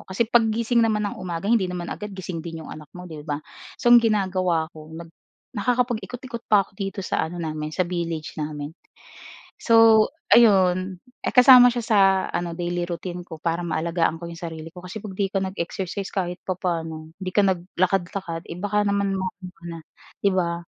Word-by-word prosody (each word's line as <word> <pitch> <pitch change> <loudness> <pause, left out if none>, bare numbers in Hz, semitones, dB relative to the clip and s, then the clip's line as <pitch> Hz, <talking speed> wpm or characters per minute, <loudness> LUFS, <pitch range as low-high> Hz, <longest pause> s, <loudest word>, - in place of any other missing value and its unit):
Kasi 190 +5 +1
paggising 230 +1 +2
naman 215 -2 +2
ng - - -9
umaga 175 -1 -4
hindi 210 -3 +2
naman 175 -1 -4
agad 210 - -6
gising 180 -3 -5
din 165 -1 -7
'yong - - -8
anak 155 -1 -11
mo, 180 - -8
'di 160 -4 -8
ba? 145 - 0 0.4
So, 240 - +3
ang 240 - +9
ginagawa 185 -7 0
ako 155 +1 -11
nag 170 0 -10 0.4
nakakapag-ikot-ikot 245 +1 -2
pa 205 -2 +5
ako - - -25
dito 195 0 -5
sa 160 - -1
ano 175 - -8
namin, 155 -2 -4
sa 185 - +2
village 170 -3 -4
namin. 150 0 -5 0.9
So, 225 -2 +6 0.2
ayun, 185 -4 +4 0.2
eh, - - -1
kasama 250 -1 +8
siya 240 - -2
sa 220 -2 +1 0.3
ano, 175 -1 -3
daily 175 +1 -2
routine 175 +1 -6
ko 160 -3 -10
para 170 +1 -1
maalagaan 165 0 -1
ko 170 - -6
'yong 170 - -9
sarili 165 -1 -7
ko 180 +2 -12
kasi 195 +3 -7
'pag 195 -3 -8
'di 200 -1 +1
ka 195 - +1
nag-exercise 190 +1 -4
kahit 180 -2 -2
papa'no, 165 -4 -3
'di 185 -1 -5
ka 205 - +4
naglakad-lakad, 180 -1 -2
eh, - - -7
baka 205 +1 +1
naman 200 -1 0
ma 190 - -2 0.2
ano 180 - -7
ka 170 - -23
na, 165 - -7 0.4
'di 200 - +3
ba? 170 -1 0
185 Hz, 190 wpm, -24 LUFS, 170-210 Hz, 0.9 s, ang